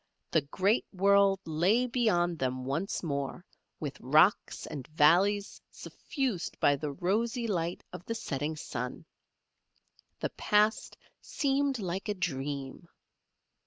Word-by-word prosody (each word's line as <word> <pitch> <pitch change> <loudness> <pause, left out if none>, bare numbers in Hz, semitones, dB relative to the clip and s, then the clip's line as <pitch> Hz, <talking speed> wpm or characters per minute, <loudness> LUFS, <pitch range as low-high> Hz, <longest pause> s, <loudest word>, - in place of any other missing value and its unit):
The 160 - +3
great 190 - +1
world 195 0 +4
lay 180 +10 +2
beyond 190 - +1
them 130 0 -2
once 165 +11 -2
more 140 +3 -3 0.3
with 145 -3 -5
rocks 155 +10 +3
and 140 -5 -7
valleys 180 +7 +3
suffused 260 - -4
by 145 - +4
the 145 +1 -4
rosy 225 - 0
light 175 -5 -2
of - - -8
the 230 - -3
setting 150 -7 -3
sun. 125 -4 -5 1.1
The - - -2
past 210 +1 +1 0.2
seemed 275 -1 0
like 190 0 -4
a 205 - 0
dream. 140 -3 -4
175 Hz, 120 wpm, -30 LUFS, 145-210 Hz, 1.1 s, world